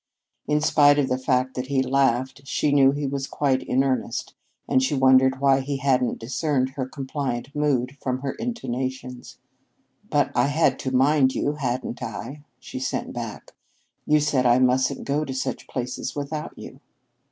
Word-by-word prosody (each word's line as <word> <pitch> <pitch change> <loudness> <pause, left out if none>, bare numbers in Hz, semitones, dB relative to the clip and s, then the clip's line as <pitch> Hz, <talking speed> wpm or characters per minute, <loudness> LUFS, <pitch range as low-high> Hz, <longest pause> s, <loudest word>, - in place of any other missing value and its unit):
In 150 +1 +2
spite 145 -1 +5
of 140 -2 +1
the 125 - +1
fact 130 0 0
that 125 0 -4
he 135 -1 +1
laughed, 130 0 0
she 145 +2 0
knew 140 -2 +6
he 145 +1 -3
was 135 0 -3
quite 135 -3 0
in 130 +2 +1
earnest, 130 -3 -2 0.3
and 130 - +3
she 130 +3 0
wondered 130 0 +4
why 135 -1 +4
he 140 +1 -3
hadn't 130 -2 +1
discerned 130 +2 -1
her 130 -1 -4
compliant 135 -1 -4
mood 140 -3 0
from 130 -1 -2
her 135 -1 -2
intonations. 130 - -5 0.7
"But - - +2
I - - +2
had 155 +3 +2
to 130 - -3
mind 135 +1 +3
you, 145 - 0
hadn't 130 -4 -3
I?" 145 +2 -6 0.2
she - - -7
sent 130 - -3
back. 115 -3 -7 0.6
"You 150 0 +4
said 135 -4 +2
I 120 0 +5
mustn't 130 0 +2
go 145 +2 0
to 135 -3 -5
such 130 - -3
places 125 -1 -4
without 145 +1 -5
you." - - -10
135 Hz, 170 wpm, -24 LUFS, 130-145 Hz, 0.7 s, knew